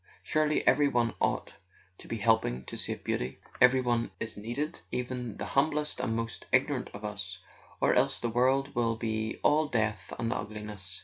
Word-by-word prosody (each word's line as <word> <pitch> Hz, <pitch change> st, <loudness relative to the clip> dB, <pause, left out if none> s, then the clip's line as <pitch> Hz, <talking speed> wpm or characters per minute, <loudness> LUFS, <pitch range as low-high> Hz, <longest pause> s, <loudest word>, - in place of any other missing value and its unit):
Surely 155 Hz, 0 st, +1 dB
every 145 Hz, +2 st, +5 dB
one 120 Hz, -4 st, +1 dB
ought -, -, 0 dB, 0.5 s
to -, -, -12 dB
be 115 Hz, -, -3 dB
helping 105 Hz, -, +2 dB
to -, -, -7 dB
save -, -, 0 dB
Beauty; 65 Hz, +2 st, -2 dB, 0.2 s
every 130 Hz, +1 st, +7 dB
one 120 Hz, -3 st, +1 dB
is 110 Hz, -, -4 dB
needed, 120 Hz, +10 st, -3 dB
even 125 Hz, -3 st, -3 dB
the -, -, -4 dB
hum¬ 140 Hz, +3 st, +3 dB
blest 150 Hz, 0 st, -1 dB
and 110 Hz, -, -1 dB
most 115 Hz, 0 st, -4 dB
ignorant -, -, +2 dB
of 100 Hz, +1 st, -7 dB
us, 100 Hz, -2 st, -4 dB, 0.4 s
or -, -, +3 dB
else -, -, +3 dB
the 120 Hz, -, -1 dB
world 130 Hz, +4 st, +2 dB
will 115 Hz, -1 st, +1 dB
be 110 Hz, -1 st, -2 dB
all 155 Hz, +1 st, +4 dB
death 110 Hz, -, -1 dB
and 115 Hz, 0 st, -1 dB
ugliness. 105 Hz, -5 st, -5 dB
115 Hz, 180 wpm, -30 LUFS, 105-130 Hz, 0.5 s, every